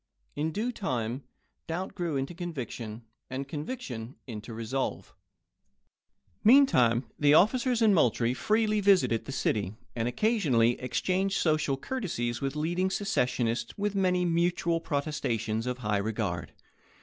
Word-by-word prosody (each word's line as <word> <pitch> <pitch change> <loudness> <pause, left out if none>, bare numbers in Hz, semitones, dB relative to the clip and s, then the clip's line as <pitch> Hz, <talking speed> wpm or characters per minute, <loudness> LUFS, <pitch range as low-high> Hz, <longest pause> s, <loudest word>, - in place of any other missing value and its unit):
In 155 +2 -1
due 220 +9 -1
time, 125 - -3 0.4
doubt 180 +4 -3
grew 170 -5 -2
into 135 +5 -3
conviction, 125 -10 -6 0.3
and 135 +1 -4
conviction 140 - -6
into 110 -2 -7
resolve. 115 +4 -3 1.3
Meantime 170 - +5
the 145 0 +5
officers 240 +5 +3
in 215 -2 +6
Moultrie 120 - +3
freely 215 - +1
visited 180 - +3
the - - -6
city, 105 -6 -1 0.2
and 115 -1 -1
occasionally 130 - +2
exchanged 190 +9 0
social 155 -4 +1
courtesies 140 - -3
with 135 +1 -2
leading 175 +5 0
secessionists 125 - -1
with 205 0 -1
many 180 -2 +2
mutual 170 0 +1
pro 145 -3 -1
testations 115 -6 -2
of 125 0 -2
high 105 -4 0
regard. 100 -6 -3
145 Hz, 125 wpm, -29 LUFS, 120-185 Hz, 1.3 s, in